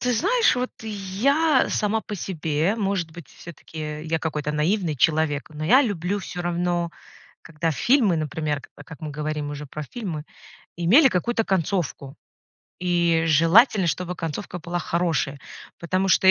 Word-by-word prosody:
Ты 250 - +1
знаешь, 455 - +3
вот 250 +1 -1
я 225 +9 +1
сама 215 +1 0
по 210 - -6
себе, 165 -1 -1
может 195 -6 -1
быть, 165 -4 -11
всё-таки 155 -2 -8
я 160 0 0
какой-то 150 -2 -3
наивный 165 +2 0
человек, 155 +1 +1
но 155 0 -6
я 255 - +6
люблю 200 - -1
всё 180 -2 -6
равно, 175 0 -1 0.5
когда 165 +1 -2
фильмы, 220 - +3
например, 150 -1 -2
к - - -14
а, 145 - -12
как 160 -3 -12
мы 155 - -5
говорим 150 0 -3
уже 145 0 -6
про 155 +3 -6
фильмы, 165 - -5 0.5
имели 220 - +6
какую-то 225 +3 0
концовку, 175 -8 -1 0.7
и 170 -2 +2
желательно, 175 - +5
чтобы 180 +2 -2
концовка 165 +3 -5
была 175 +1 -4
хорошая, 165 -5 -1 0.4
потому 185 +3 0
что, 190 0 +4
170 Hz, 150 wpm, -24 LUFS, 155-200 Hz, 0.7 s, я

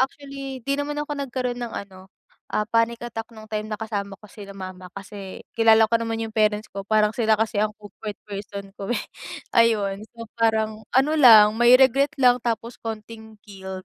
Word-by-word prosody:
actually, 275 -1 -4
di 275 - 0
naman 295 +1 -3
ako 295 0 -4
nagkaroon 250 -2 -3
ng 240 - -5
ano, 190 -1 -9 0.4
ah, 210 - +1
panic 230 0 +1
attack 225 -1 -6
nung 220 -1 -13
time 215 0 -3
na 215 - -3
kasama 200 -2 -4
ko 210 - -14
sila 200 -1 -11
mama 185 -1 -8
kasi, 200 -1 -9 0.2
kilala 225 -1 +5
ko 230 - +3
naman 225 0 -3
yung 220 - -15
parents 215 0 +1
ko, 195 0 -6
parang 215 -1 +3
sila 220 -2 +2
kasi 220 -1 -1
ang 215 0 0
comfort 205 +1 -8 0.2
person 200 0 -7
ko 195 - -6
eh, - - -1 0.5
ayun, 210 -3 +2
so 230 0 -9
parang 220 -1 0
ano 270 +4 +4
lang, 220 -7 +8
may 240 +1 +7
regret 275 +2 +4
lang, 250 -1 +6
tapos 230 0 -2
konting 220 0 -8
guilt, 190 -2 -8
220 Hz, 185 wpm, -23 LUFS, 205-240 Hz, 0.5 s, lang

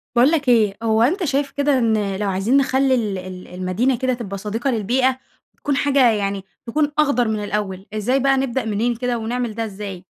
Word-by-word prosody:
باقول 255 +6 +5
لك 290 -6 +1
إيه، 215 -4 +3
هو 220 0 +2
أنت 360 - +2
شايف 280 -2 0
كده 285 -1 +1
إن 215 -5 +1
لو 205 0 -2
عايزين 195 +8 +2
نخلّي 270 -1 +2
ال 210 -6 -1
ال 185 0 -8
المدينة 185 +8 -1
كده 260 +1 0
تبقى 210 -5 -5
صديقة 220 +6 -2
للبيئة، 255 +4 +1 0.3
وتكون 285 - -2
حاجة 275 -3 +4
يعني 200 -2 -2 0.2
تكون 290 +5 0
أخضر 280 -6 +3
من 215 -1 -2
الأول، 200 -2 -3
إزاي 230 +6 +1
بقى 270 0 +3
نبدأ 265 -1 -1
منين 225 +3 0
كده، 245 0 -2
ونعمل 235 +1 -3
ده 225 0 -2
إزاي؟ 195 -3 -7
235 Hz, 195 wpm, -21 LUFS, 205-265 Hz, 0.3 s, باقول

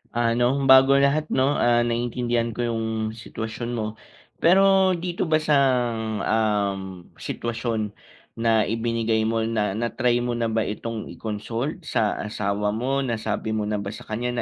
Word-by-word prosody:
Ano, 120 0 +2 0.3
bago 130 +1 +8
lahat 150 +2 +2
'no, 130 - +3 0.2
ah, 120 0 +4
naiintindihan 120 0 -1
ko - - -11
yung 115 -1 -2 0.4
sitwasyon 115 +2 -5
mo. 110 - -1 0.6
Pero 190 +1 +5
dito 175 +1 -2
ba 155 - +6
sa, 150 -1 +2 0.8
um, 105 -3 +1 0.4
sitwasyon 115 -1 -3 0.6
na 115 -1 +3
ibinigay 115 0 0
mo 115 +1 0
na, 110 -3 0
na-try 120 +1 +1
mo 120 0 -1
na 115 -1 0
ba 110 0 +1
itong 110 +1 -5
i-consult 115 - -4
sa 110 -7 0
asawa 105 0 -1
mo, 130 +4 0
nasabi 110 -4 -2
mo 110 - -1
na 105 0 -2
ba 100 0 -5
sa - - -10
kanya 120 +2 -2
115 Hz, 145 wpm, -24 LUFS, 110-125 Hz, 0.8 s, bago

